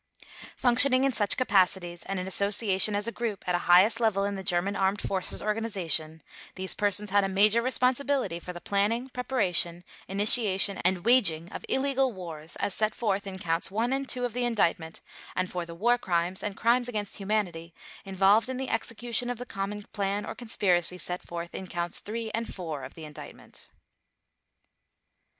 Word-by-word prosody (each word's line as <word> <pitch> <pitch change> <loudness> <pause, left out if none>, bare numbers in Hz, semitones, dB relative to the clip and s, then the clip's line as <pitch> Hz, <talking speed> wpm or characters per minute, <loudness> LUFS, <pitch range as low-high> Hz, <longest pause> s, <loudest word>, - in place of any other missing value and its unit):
Functioning 255 +1 +4
in 275 - +3
such 210 -4 +2
capacities 185 -7 +1
and 195 -1 -2
in 180 - -4
association 200 +1 +3
as 205 +2 0
a - - -1
group 225 -6 -4
at 180 - +1
a 175 - +2
highest 190 +6 +6
level 220 -4 +2
in 200 0 -1
the 195 - -5
German 185 +2 0
Armed 195 +1 +1
Forces 190 -2 0
Organization, 185 -8 -2 0.3
these 190 0 -1
persons 205 0 0
had 205 0 +4
a 195 - -1
major 210 +4 +3
responsibility 255 -4 0
for 180 - -7
the 175 - -8
planning, 210 +7 0
preparation, 185 -10 -1 0.2
initiation, 200 -1 +3
and 180 +1 0
waging 180 -10 +3
of - - -7
illegal 270 -1 +2
wars 165 -4 -6
as 200 - -2
set 215 +1 0
forth 200 -3 -1
in 190 -1 -6
Counts 165 -2 -1
One 225 +6 0
and 270 0 -2
Two 250 -1 0
of 240 - -4
the 250 +1 -1
Indictment 170 -8 0 0.3
and 185 0 -1
for 175 -1 -4
the 170 - -9
War 240 +7 +2
Crimes 175 0 -1
and 210 0 -4
Crimes 240 +2 +2
against 210 -4 -4
Humanity 190 -5 -2 0.3
involved 195 +4 +3
in 260 - -3
the 265 0 -4
execution 240 +1 -2
of 245 - -3
the 250 - -7
common 205 -1 -5
plan 200 0 -1
or - - -5
conspiracy 180 -7 0
set 180 0 -4
forth 170 0 -7
in 190 - -6
Counts 175 0 -3
Three 225 +1 -5
and 230 +1 -3
Four 160 -7 -5
of 130 - -9
the 160 - -10
Indictment. 150 -1 -11
200 Hz, 180 wpm, -28 LUFS, 180-230 Hz, 0.3 s, highest